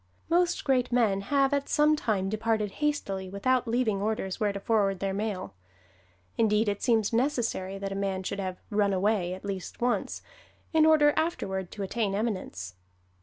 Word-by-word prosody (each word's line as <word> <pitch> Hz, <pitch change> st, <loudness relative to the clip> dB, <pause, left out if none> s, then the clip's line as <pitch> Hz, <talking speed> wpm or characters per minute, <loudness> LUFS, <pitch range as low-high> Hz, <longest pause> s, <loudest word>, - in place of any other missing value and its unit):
Most 355 Hz, +1 st, +2 dB
great 255 Hz, -3 st, +1 dB
men 220 Hz, -5 st, +2 dB
have 275 Hz, +5 st, +2 dB
at 280 Hz, 0 st, -1 dB
some 300 Hz, 0 st, +4 dB
time 205 Hz, -9 st, -1 dB
departed 215 Hz, 0 st, 0 dB
hastily 195 Hz, -11 st, -1 dB
without 250 Hz, +6 st, +1 dB
leaving 225 Hz, -4 st, +1 dB
orders 205 Hz, -3 st, -2 dB
where 210 Hz, -1 st, +1 dB
to 200 Hz, -, -5 dB
forward 200 Hz, -3 st, +1 dB
their 195 Hz, 0 st, -1 dB
mail. 200 Hz, -, -3 dB, 0.9 s
Indeed, 215 Hz, -1 st, +3 dB
it 205 Hz, 0 st, -1 dB
seems 225 Hz, -3 st, +2 dB
necessary 230 Hz, -7 st, 0 dB
that 195 Hz, 0 st, -4 dB
a 195 Hz, 0 st, -2 dB
man 190 Hz, -1 st, -2 dB
should 200 Hz, +2 st, -4 dB
have 185 Hz, -2 st, -3 dB
"run 205 Hz, -1 st, +2 dB
away" 190 Hz, -2 st, +1 dB
at 190 Hz, -, -12 dB
least 195 Hz, -2 st, -5 dB
once, 245 Hz, 0 st, -1 dB, 0.5 s
in 315 Hz, -1 st, +5 dB
order 295 Hz, -2 st, +5 dB
afterward 190 Hz, -, -1 dB
to 205 Hz, -, -5 dB
attain 200 Hz, 0 st, -1 dB
eminence. 185 Hz, -, -3 dB
210 Hz, 170 wpm, -28 LUFS, 195-245 Hz, 0.9 s, in